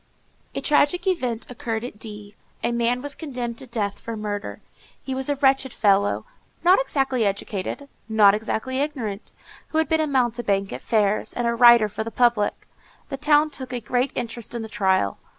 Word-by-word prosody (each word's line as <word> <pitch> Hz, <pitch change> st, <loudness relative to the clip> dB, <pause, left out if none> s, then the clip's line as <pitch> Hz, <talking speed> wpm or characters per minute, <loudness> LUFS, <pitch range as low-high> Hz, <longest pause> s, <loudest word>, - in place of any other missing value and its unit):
A -, -, -2 dB
tragic 300 Hz, +4 st, +2 dB
event 250 Hz, -, -1 dB
occurred 230 Hz, -2 st, -4 dB
at 240 Hz, -4 st, -8 dB
D—— 210 Hz, -2 st, -8 dB, 0.3 s
A -, -, +1 dB
man 235 Hz, +2 st, 0 dB
was 290 Hz, 0 st, -2 dB
condemned 245 Hz, -7 st, -5 dB
to 265 Hz, -, -6 dB
death 210 Hz, -4 st, -2 dB
for 230 Hz, -1 st, -6 dB
murder. 205 Hz, -1 st, -4 dB, 0.4 s
He 265 Hz, -, -5 dB
was 265 Hz, +1 st, -2 dB
a 285 Hz, -, +2 dB
wretched 270 Hz, -1 st, +2 dB
fellow, 200 Hz, -2 st, +2 dB, 0.4 s
not 365 Hz, +6 st, +6 dB
exactly 270 Hz, -, 0 dB
educated, 200 Hz, +6 st, -3 dB, 0.2 s
not 210 Hz, -2 st, +6 dB
exactly 220 Hz, +4 st, -2 dB
ignorant, 240 Hz, -9 st, -3 dB, 0.4 s
who 315 Hz, -, -3 dB
had 320 Hz, -, +2 dB
been 320 Hz, -1 st, +2 dB
a 310 Hz, -, 0 dB
mountebank 235 Hz, -7 st, 0 dB
at 125 Hz, -, -6 dB
fairs, 210 Hz, -2 st, +1 dB
and 240 Hz, -, -2 dB
a 235 Hz, -, +2 dB
writer 235 Hz, -2 st, +7 dB
for 210 Hz, +1 st, -4 dB
the 225 Hz, -, -5 dB
public. 235 Hz, -3 st, +1 dB, 0.4 s
The 275 Hz, -, -4 dB
town 300 Hz, +1 st, +3 dB
took 260 Hz, -3 st, -7 dB
a 250 Hz, -, -2 dB
great 245 Hz, +4 st, -1 dB
interest 235 Hz, -1 st, -5 dB
in 235 Hz, -, -3 dB
the 220 Hz, -, -7 dB
trial. 190 Hz, -, +1 dB
235 Hz, 185 wpm, -23 LUFS, 215-270 Hz, 0.4 s, writer